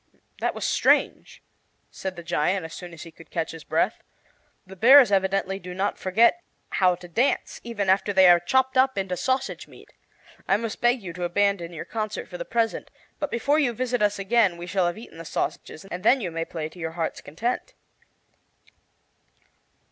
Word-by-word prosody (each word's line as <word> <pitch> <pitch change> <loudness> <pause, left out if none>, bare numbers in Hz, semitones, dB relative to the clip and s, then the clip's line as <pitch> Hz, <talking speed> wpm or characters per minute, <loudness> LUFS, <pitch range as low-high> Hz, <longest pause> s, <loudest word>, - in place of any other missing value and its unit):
"That - - -1
was - - -3
strange," - - +1 0.5
said 190 -1 -5
the 175 - -9
giant, 175 +2 0
as 160 - -9
soon 180 -1 -8
as 165 -2 -10
he 165 - -11
could 160 0 -17
catch 165 -2 -3
his 165 -1 -10
breath; 170 +7 0 0.6
"the 190 +1 -12
bears 250 +3 +7
evidently 195 0 +1
do 180 -1 -8
not 195 +2 -1
forget 225 - +3 0.3
how 180 -1 +3
to 175 0 -12
dance 235 +11 0
even 225 -4 -3
after 195 +2 +2
they 190 -2 +6
are 175 -1 +7
chopped 260 +8 +1
up 265 -2 +3
into 190 -2 -1
sausage 260 +7 -2
meat. - - -17 0.5
I 195 - +3
must 225 -1 -5
beg 240 -1 +2
you 175 -3 -6
to 180 +1 -6
abandon 175 -1 0
your 165 - -7
concert 215 -2 -4
for - - -8
the - - -4
present, 230 - -1 0.3
but 295 - -2
before 280 +6 +1
you 260 -6 +1
visit 245 0 -2
us 210 0 +2
again 200 -2 +2
we 170 - -7
shall 185 -1 +1
have 175 - -3
eaten 220 -7 -12
the - - -7
sausages, 155 +1 -4
and 180 -2 -6
then 260 +5 +5
you 185 -7 -4
may 165 0 -3
play 160 -2 -5
to 165 +3 -15
your 160 -1 -4
heart's 165 -1 -3
content." 225 +12 -4
195 Hz, 195 wpm, -25 LUFS, 175-235 Hz, 0.6 s, bears